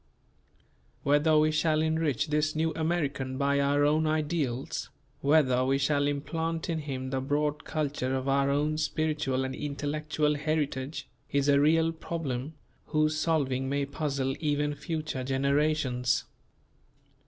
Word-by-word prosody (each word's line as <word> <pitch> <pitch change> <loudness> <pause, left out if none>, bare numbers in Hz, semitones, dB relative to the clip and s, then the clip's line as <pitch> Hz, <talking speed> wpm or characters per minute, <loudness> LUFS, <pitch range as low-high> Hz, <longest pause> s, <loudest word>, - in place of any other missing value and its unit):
Whether 145 +2 +4
we 155 0 +4
shall 155 0 +2
enrich 160 -3 0
this 150 +1 +1
New 160 +1 0
American 150 -5 -1
by 140 0 +2
our 145 +1 +3
own 155 +2 +2
ideals, 150 -5 -1 0.3
whether 140 -4 +3
we 135 +1 +2
shall 145 +1 +1
implant 160 +3 -2
in 160 - -1
him 130 -3 -4
the 135 -1 -1
broad 145 +1 -1
culture 140 -4 -1
of 130 0 -3
our 140 0 +2
own 150 +2 +1
spiritual 150 -4 0
and 130 - -4
intellectual 150 +1 -1
heritage, 145 -2 -2 0.2
is 140 0 +1
a 140 -1 +5
real 160 +2 +4
problem 160 -4 -4 0.3
whose 155 0 +1
solving 140 -5 0
may 140 0 0
puzzle 140 -2 -2
even 150 -1 0
future 155 -2 -4
generations. 135 -1 +1
145 Hz, 130 wpm, -29 LUFS, 135-155 Hz, 0.3 s, a